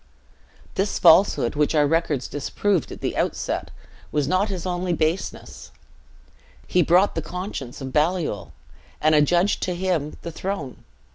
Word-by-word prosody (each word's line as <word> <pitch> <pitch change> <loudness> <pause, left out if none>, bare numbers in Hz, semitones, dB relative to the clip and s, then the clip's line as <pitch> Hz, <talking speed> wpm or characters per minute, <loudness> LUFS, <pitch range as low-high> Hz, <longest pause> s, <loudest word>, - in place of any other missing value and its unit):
This 195 +2 -1
falsehood, 170 -7 +5
which 150 +2 +1
our 150 -1 +4
records 155 -3 0
disproved 180 +4 -1
at - - -9
the - - -2
outset, - - -2 0.4
was 150 -2 0
not 185 +5 +1
his 185 -3 -4
only 180 0 -1
baseness; 160 +3 -3 1.0
he 180 - +2
bought 180 +4 +4
the 165 - -2
conscience 165 - -6
of 130 -1 -6
Baliol, 155 - 0 0.5
and 155 +1 +3
adjudged 175 +6 +3
to 180 - -1
him 175 -5 -1
the 170 - -5
throne. 165 -6 -5
170 Hz, 140 wpm, -23 LUFS, 150-185 Hz, 1.0 s, falsehood